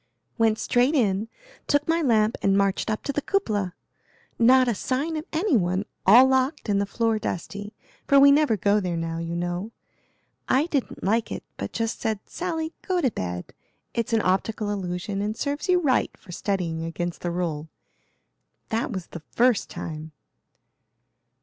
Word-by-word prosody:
"Went 220 -1 +3
straight 250 +7 +2
in, 210 -5 +1 0.4
took 290 0 +2
my 330 +1 +2
lamp 225 -5 +3
and 195 0 +3
marched 200 +1 +1
up 215 - -2
to 280 - -2
the 295 - -1
cupola. 210 - -1 0.6
Not 255 +2 +6
a 240 - +2
sign 270 - -2
of 310 0 -4
any 335 0 +1
one, 185 -1 +1 0.2
all 240 +7 +9
locked 265 +2 +1
and 200 -1 +2
the 200 - -1
floor 225 0 0
dusty, 205 +2 -5 0.3
for 280 - +6
we 280 0 +8
never 285 -6 +3
go 200 +2 +3
there 180 -4 -2
now, 165 0 -3
you 170 0 -4
know. 175 +5 -3 0.8
I 270 +4 +4
didn't 290 -6 -3
like 220 +3 +1
it, - - -5
but - - -5
just 225 -1 -2
said, 220 -2 -1
'Sally, 325 -2 -3
go 370 -2 0
to 265 -8 +2
bed; 90 - -5 0.4
it's 230 -1 -2
an 225 -1 +2
optical 205 +3 0
illusion 195 0 -3
and 210 +2 -2
serves 290 +4 -3
you 360 -1 +5
right 280 -7 +2
for 185 - -14
studying 175 -4 -2
against 170 +1 -4
the 175 - -2
rule.' 165 -3 -3 1.0
That 225 +2 -1
was 185 -5 -4
the 170 - -9
first 245 -3 +3
time." 155 -1 -7
215 Hz, 170 wpm, -25 LUFS, 185-265 Hz, 1.0 s, all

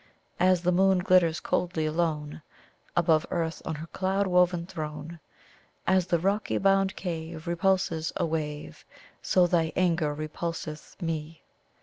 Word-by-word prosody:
"As 185 -1 +3
the 180 - +3
moon 190 +1 +4
glitters 180 -3 +3
coldly 170 -3 -1
alone, 155 -1 -1 0.5
Above 160 -2 +3
earth 165 -2 -2
on 160 - -3
her 155 +2 -6
cloud 190 +3 -1
woven 180 -2 +2
throne, 155 -2 -6 0.7
As 185 -1 +3
the 175 - +2
rocky 195 +5 0
bound 195 0 +2
cave 165 -2 -5
repulses 170 -2 0
a - - 0
wave, 150 - -4 0.4
So 180 -1 +3
thy 165 -2 +1
anger 170 -4 +2
repulseth 155 0 -6
me. 160 -1 -4
170 Hz, 130 wpm, -27 LUFS, 160-185 Hz, 0.7 s, moon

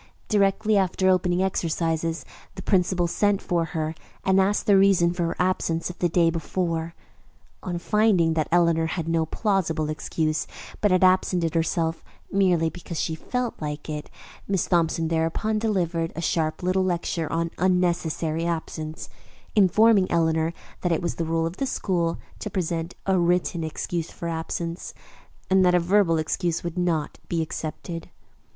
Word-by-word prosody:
Directly 210 +1 +3
after 190 0 +2
opening 180 0 +2
exercises 165 -2 -1 0.3
the 190 - -7
principal 180 -2 +2
sent 200 +3 +1
for 170 -2 0
her 160 -2 -3 0.3
and 190 0 +4
asked 200 +2 +1
the 205 - +5
reason 190 -3 +4
for 175 -1 -1
her 165 - -3
absence 180 -2 0
of 180 - -16
the 175 - +2
day 165 0 +3
before. 165 0 -2 0.7
On 175 -2 -3
finding 185 -3 +3
that 155 -2 0
Eleanor 170 -1 +3
had 165 -1 -3
no 165 -1 +1
plausible 165 -7 0
excuse, 155 0 -1 0.3
but 210 - +4
had 185 0 +3
absented 185 -3 +3
herself 165 0 0 0.3
merely 180 -4 +3
because 170 0 -6
she 160 - -1
felt 250 +9 -3
like 150 0 -4
it, 150 -1 -5 0.4
Miss 195 -3 +1
Thompson 165 -2 +1
thereupon 165 +7 0
delivered 175 -6 0
a - - -4
sharp 160 0 -1
little 185 +1 +2
lecture 170 -3 -1
on 165 0 -1
unnecessary 170 -3 +1
absence, 160 -1 -4 0.5
informing 210 0 +5
Eleanor 160 -1 +2 0.3
that 175 - 0
it 165 +2 0
was 170 - -1
the 165 - -3
rule 165 0 0
of 165 +3 -4
the 270 - -1
school 170 -8 -1 0.2
to 210 - -4
present 170 -3 -2
a 190 -1 +2
written 175 -1 +1
excuse 165 +1 -3
for 170 - -6
absence, 165 +1 -4 0.5
and 190 0 +4
that 180 -1 +4
a - - +5
verbal 175 -1 +3
excuse 165 +2 -1
would 170 -1 -4
not 170 -4 -1
be 165 -1 0
accepted. 165 +1 -6
170 Hz, 160 wpm, -25 LUFS, 165-185 Hz, 0.7 s, the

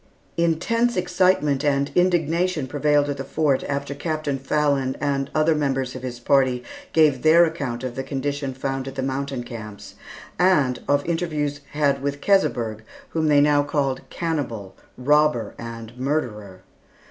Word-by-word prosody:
Intense 185 +9 +1
excitement 180 -6 +2
and 140 -1 +1
indignation 175 -2 +1
prevailed 145 +1 +2
at 145 -1 -3
the 135 - -4
Fort 145 -2 0
after 140 0 -3
Captain 150 -2 -2
Fallon 135 -1 0
and 140 -2 -1
other 155 +1 +3
members 135 -4 -1
of 130 - -6
his 125 -1 -6
party 130 -1 +2 0.3
gave 150 -5 +4
their 165 +2 +6
account 135 -7 -4
of 130 -2 -3
the 135 - -3
conditions 135 0 -3
found 135 0 -3
at 135 - -7
the 135 - -2
mountain 135 -1 -3
camps, 110 -4 -9 0.5
and 150 -9 +3
of 145 0 +2
interviews 155 -4 -2
had 140 -2 +1
with 140 0 -2
Keseberg, 120 - +1 0.3
whom 160 -1 0
they 145 -1 +5
now 145 0 +4
called, 140 -2 -1
"cannibal, 120 - -3 0.2
robber, 150 -2 +2
and 115 0 -8
murderer." 105 -10 -3
140 Hz, 145 wpm, -23 LUFS, 130-155 Hz, 0.5 s, their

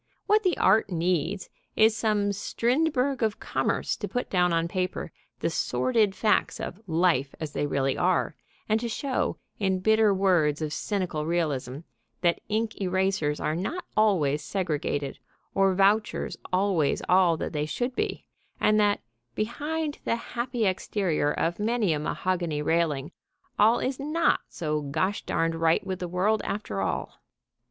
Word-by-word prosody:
What 425 +1 +4
the 370 -5 +1
art 200 +2 +4
needs 175 +2 0 0.3
is 220 0 +5
some 210 -2 +1
Strindberg 255 +6 0
of 220 -2 0
Commerce - - -1
to - - -4
put 245 - -3
down 180 -2 +3
on 165 0 +1
paper 185 +1 -3 0.3
the - - +1
sordid 220 -6 +1
facts 210 0 +1
of 180 - -5
Life 160 -5 +2
as 155 -2 -5
they 145 - -1
really 135 -1 0
are, 180 0 +1 0.3
and 215 +1 +2
to 235 +1 -3
show, 260 +3 -1 0.2
in 190 -2 +1
bitter 220 +2 +4
words 180 -6 +2
of 155 -1 -3
cynical 180 -7 -2
realism, 145 -5 -1 0.4
that 170 -1 +2
ink 220 0 -1
erasers 185 -5 0
are 155 - -1
not 255 - -3
always 160 -9 +3
segregated 150 -5 -2 0.3
or 195 -1 +3
vouchers 200 +3 +2 0.2
always 185 -6 +1
all 180 -3 +4
that - - -4
they 150 0 -1
should 245 +9 -2
be, - - -2 0.3
and 215 0 +3
that, 205 -1 +2 0.3
behind 295 +7 -2
the - - +1
happy 235 0 -3
exterior 185 -5 0
of 170 +4 -1
many 215 -4 +1
a 150 - -1
mahogany 170 -1 -1
railing, 155 -2 0 0.5
all 220 +3 +6
is 260 +1 -2
not 310 +4 +2
so 150 -2 -2
gosh 185 +8 -1
darned 165 0 0
right 165 0 +2
with 185 -1 -3
the 180 - -3
world 195 +5 +1
after 150 - -3
all. 95 - -3
190 Hz, 150 wpm, -27 LUFS, 165-220 Hz, 0.5 s, all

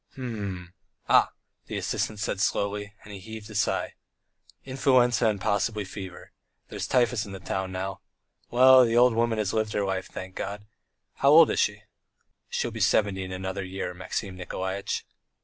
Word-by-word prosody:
"H - - -27
m... 100 -8 -5 0.4
Ah!.. - - +6 0.2
." - - -51
the - - -4
assistant 110 - -2
said 105 -2 -2
slowly, 105 0 -1
and 105 - -11
he 100 - -7
heaved 110 +2 -9
a - - -9
sigh. 105 - 0 0.7
"Influenza 125 -4 +3
and 105 -2 0
possibly 100 +2 0
fever. 95 -2 -9 0.4
There's - - -4
typhus 120 -3 +2
in 100 -2 -8
the 95 - -7
town 95 0 -3
now. 95 +1 -4 0.5
Well, 130 +1 +7
the 115 -1 +2
old 125 0 +6
woman 115 0 +1
has 105 -2 -1
lived 110 -1 0
her 100 - 0
life, 95 -1 -2
thank 95 0 -8
God.... 100 +2 -5 0.5
How 140 - +4
old 160 +2 +8
is - - 0
she?" - - 0 0.7
"She'll - - -2
be - - -7
seventy 100 -3 +2
in 95 - -7
another 95 +1 -4
year, 95 -1 -4
Maxim 95 +2 -4
Nikolaitch." 95 +1 -4
105 Hz, 175 wpm, -27 LUFS, 95-115 Hz, 0.7 s, old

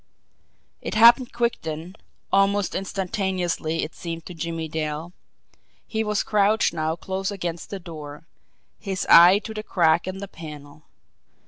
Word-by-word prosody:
It - - -5
happened 235 +3 +6
quick 235 0 -1
then, 160 +4 -6 0.4
almost 195 0 +2
instantaneously 185 -4 -2
it 155 - -5
seemed 165 -1 -6
to 180 - -8
Jimmie 165 -1 -4
Dale. 155 +2 -4 0.7
He 220 0 -2
was 210 -1 0
crouched 210 +1 +2
now 160 -1 -1
close 190 +2 -3
against 175 -4 -5
the 200 - -5
door, 155 -4 -9 0.5
his 195 -2 -3
eye 175 +3 +9
to 220 - -6
the 215 - -4
crack 170 -4 +2
in 185 0 -4
the 200 +1 -6
panel. 150 -4 -11
180 Hz, 140 wpm, -24 LUFS, 160-200 Hz, 0.7 s, eye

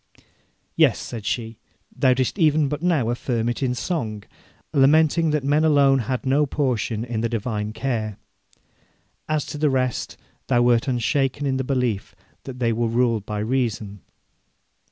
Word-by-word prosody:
'Yes,' - - +4
said 115 -4 -7
she; 115 -2 -3 0.4
'thou 130 -1 +3
didst 130 +9 -1
even 155 -2 +3
but 150 +1 -4
now 155 -10 +1
affirm 120 -1 -2
it 120 - -3
in 125 -2 0
song, 115 - -3 0.5
lamenting 155 +4 +4
that 150 -2 0
men 145 +3 +2
alone 140 -3 +4
had 130 +2 -3
no 140 +3 +2
portion 120 -5 -1
in 115 -2 -3
the 115 - 0
divine 110 -2 -3
care. 110 -3 -3 1.1
As 155 -2 0
to 150 - -7
the 150 -1 +3
rest, 130 -2 -1 0.3
thou 120 0 +3
wert 120 +1 +3
unshaken 135 +3 0
in 135 -1 0
the 130 - -1
belief 125 -6 -2 0.3
that 130 -2 -7
they 120 -2 +1
were 115 +1 0
ruled 115 -2 0
by 105 - -3
reason. 110 -4 -2
125 Hz, 155 wpm, -23 LUFS, 115-140 Hz, 1.1 s, Yes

